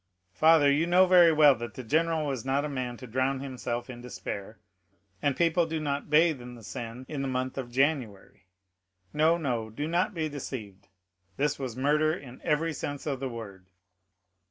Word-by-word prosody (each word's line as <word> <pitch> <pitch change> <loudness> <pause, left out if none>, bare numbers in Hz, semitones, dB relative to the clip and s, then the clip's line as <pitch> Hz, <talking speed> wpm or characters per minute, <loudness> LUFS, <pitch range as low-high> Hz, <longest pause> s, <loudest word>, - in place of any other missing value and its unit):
"Father, 155 - +5
you 155 +4 +2
know 180 +2 +6
very 180 -2 +7
well 150 -2 +6
that 120 -3 -7
the 130 - -6
general 160 +5 +1
was 135 -5 -3
not 135 +2 0
a - - -1
man 125 -3 -4
to 125 - -10
drown 130 +3 0
himself 125 -3 -4
in 120 -2 -9
despair, 110 -3 -7 0.6
and 145 -2 0
people 170 0 +2
do 160 0 -2
not 140 -2 -3
bathe 155 -2 +4
in 125 0 -9
the 115 - -13
Seine 120 +2 -7
in 145 -3 -4
the 135 - -2
month 130 0 -2
of 130 -3 -5
January. 125 - -1 0.7
No, 160 +3 +3
no, 120 -8 -2
do 145 +8 -4
not 175 +4 0
be 160 -2 -1
deceived; 110 -9 -7 0.5
this 145 0 0
was 130 -3 -5
murder 150 +4 +2
in 130 -6 -11
every 160 +1 +1
sense 145 0 -5
of 140 -4 -2
the 135 -1 -3
word." 100 -6 -9
135 Hz, 185 wpm, -28 LUFS, 125-155 Hz, 0.7 s, very